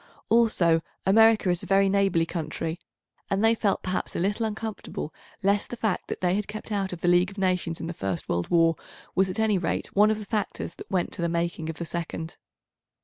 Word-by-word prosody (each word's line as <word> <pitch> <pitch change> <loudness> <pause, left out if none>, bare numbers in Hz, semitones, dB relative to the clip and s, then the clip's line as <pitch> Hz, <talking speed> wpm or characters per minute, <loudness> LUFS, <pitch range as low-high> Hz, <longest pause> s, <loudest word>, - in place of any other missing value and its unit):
Also, 190 -8 +4 0.2
America 220 +1 +5
a 180 - +4
very 195 +3 +3
neighbourly 195 -4 +2
country, 165 0 -4 0.5
and 200 +3 +2
they 225 - +6
felt 210 -3 0
perhaps 185 0 -2
a - - -1
little 205 +5 0
uncomfortable 215 -7 -5 0.3
lest 200 +1 +2
the 240 - -5
fact 220 -5 -1
that - - -5
they 180 -1 +2
had 205 +1 -1
kept 215 +1 -7
out 195 -2 -1
of 175 -2 -7
the - - 0
League 175 +1 +4
of 200 - -13
Nations 180 -3 0
in - - -4
the 170 - -4
first 95 - -3
World 85 0 -1
War 165 -1 +4 0.4
was 190 0 +2
at 185 - -3
any 215 -3 +3
rate 170 - -2
one 210 +2 +6
of 215 - +1
the 215 - -7
factors 205 -5 -3
that - - -11
went 185 -2 0
to - - -4
the 170 - +1
making 170 -1 -2
of 165 - -4
the 170 - -4
second. 165 -1 -5
185 Hz, 215 wpm, -26 LUFS, 170-210 Hz, 0.5 s, they